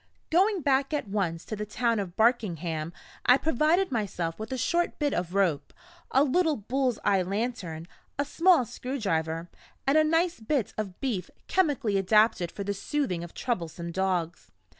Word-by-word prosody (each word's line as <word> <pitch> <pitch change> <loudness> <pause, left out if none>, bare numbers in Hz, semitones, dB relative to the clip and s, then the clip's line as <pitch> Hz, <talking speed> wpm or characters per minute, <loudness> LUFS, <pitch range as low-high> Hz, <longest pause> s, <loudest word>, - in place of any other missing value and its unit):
Going 380 +3 +3
back 275 +2 +2
at 290 - -3
once 185 -5 -2
to 215 - -4
the 210 - -4
town 230 +1 0
of 185 -3 -5
Barkingham, 175 - +1 0.4
I 250 - +8
provided 320 +5 +2
myself 185 -7 -2
with 220 +2 -6
a 260 - -2
short 345 +8 0
bit 290 -2 0
of 175 +1 -2
rope, 180 -7 +1 0.3
a 270 - +4
little 315 +2 +2
bull's 250 +2 -1
eye 195 -2 +4
lantern, 185 -4 -3 0.3
a 285 - 0
small 330 -2 +4
screwdriver, 170 - -2 0.4
and 280 +3 +4
a - - +5
nice 330 +1 +1
bit 230 0 -1
of 200 -4 -5
beef 220 -10 -2 0.2
chemically 275 - +1
adapted 195 -3 +3
for 200 - -5
the 200 +1 -2
soothing 200 -4 -2
of 175 - -10
troublesome 170 - -3
dogs. 180 -2 -2
220 Hz, 160 wpm, -28 LUFS, 180-275 Hz, 0.4 s, I